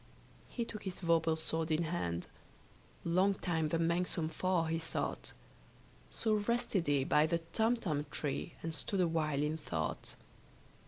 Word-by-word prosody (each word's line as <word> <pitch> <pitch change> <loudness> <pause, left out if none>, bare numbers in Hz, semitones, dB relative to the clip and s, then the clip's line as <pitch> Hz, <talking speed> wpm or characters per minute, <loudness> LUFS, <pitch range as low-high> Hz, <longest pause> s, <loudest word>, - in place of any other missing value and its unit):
He 235 - -2
took 215 -2 -7
his 190 -2 -5
vorpal 165 -2 +3
sword 160 0 -1
in 160 +1 +2
hand: 90 - -2 0.8
Long 185 +4 +3
time 165 -4 0
the 165 - +1
manxome 170 0 +1
foe 180 +1 +1
he 165 0 0
sought. 165 - -2 0.8
So 220 -1 0
rested 210 -4 +1
he 140 -2 +3
by 150 +3 +4
the 170 +1 +2 0.2
Tumtum 215 -11 +1
tree, 150 +3 -3
And 165 0 -2
stood 195 +4 -2
awhile 155 -4 +1
in 155 +1 0
thought. 80 - -3
165 Hz, 145 wpm, -34 LUFS, 155-185 Hz, 0.8 s, by